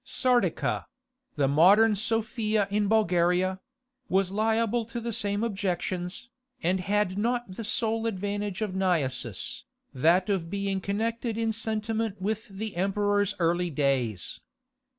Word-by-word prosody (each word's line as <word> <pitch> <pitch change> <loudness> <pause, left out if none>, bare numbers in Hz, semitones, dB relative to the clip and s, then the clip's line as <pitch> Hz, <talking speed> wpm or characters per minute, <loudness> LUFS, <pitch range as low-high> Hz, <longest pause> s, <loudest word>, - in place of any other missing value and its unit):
Sardica—the 255 - -1
modern 200 +10 +6
Sofia 220 -1 0
in 205 0 +1
Bulgaria—was 190 +3 0
liable 225 +2 +1
to 235 +1 -5
the 235 0 -3
same 205 +1 0
objections, 185 -1 -2 0.4
and 185 +3 +2
had 200 0 0
not 240 -1 -1
the 205 +5 -6
sole 225 +1 0
advantage 205 0 -2
of 205 -3 -3
Naissus, 140 - -1 0.3
that 170 +7 +3
of 190 -5 -1
being 195 0 -2
connected 225 +3 -2
in 225 -1 +1
sentiment 220 -1 -2
with 215 +4 -2
the 205 0 -6
emperor's 205 +1 +1
early 175 +1 +1
days. 130 - -1
205 Hz, 115 wpm, -27 LUFS, 185-225 Hz, 0.4 s, modern